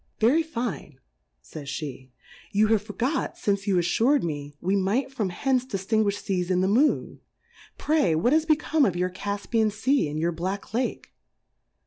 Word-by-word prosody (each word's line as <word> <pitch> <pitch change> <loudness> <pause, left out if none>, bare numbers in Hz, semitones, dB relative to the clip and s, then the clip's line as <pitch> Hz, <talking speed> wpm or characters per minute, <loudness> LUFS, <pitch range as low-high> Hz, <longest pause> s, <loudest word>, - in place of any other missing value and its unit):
Very 255 +9 +4
fine, 230 - -5 0.4
faysjlje^ 140 - -7 0.4
you 215 +1 +3
have 220 -2 +3
forgot 235 +8 -2
fmce 200 0 -1
you 195 - +2
afTur'd 230 - +2
me, 145 -3 -4
we 190 +3 0
might 205 +8 0
from 220 -8 -2
hence 255 +7 0
di 255 -6 -4
ftinguifh 205 +1 +1
Seas 180 -2 -1
in 180 -1 +2
the 190 - +2
Moon. 255 +10 +2 0.6
Pray, 295 - +2
what 235 - +2
is 320 0 +2
become 310 -1 +2
of 195 -9 +2
your 180 +1 -1
Cffpian 205 +3 -1
Sea, 220 - +1
and 150 +1 -4
your 170 +2 0
B^ack 190 +6 -4
Lake 250 +2 -2
200 Hz, 160 wpm, -26 LUFS, 175-250 Hz, 0.6 s, Very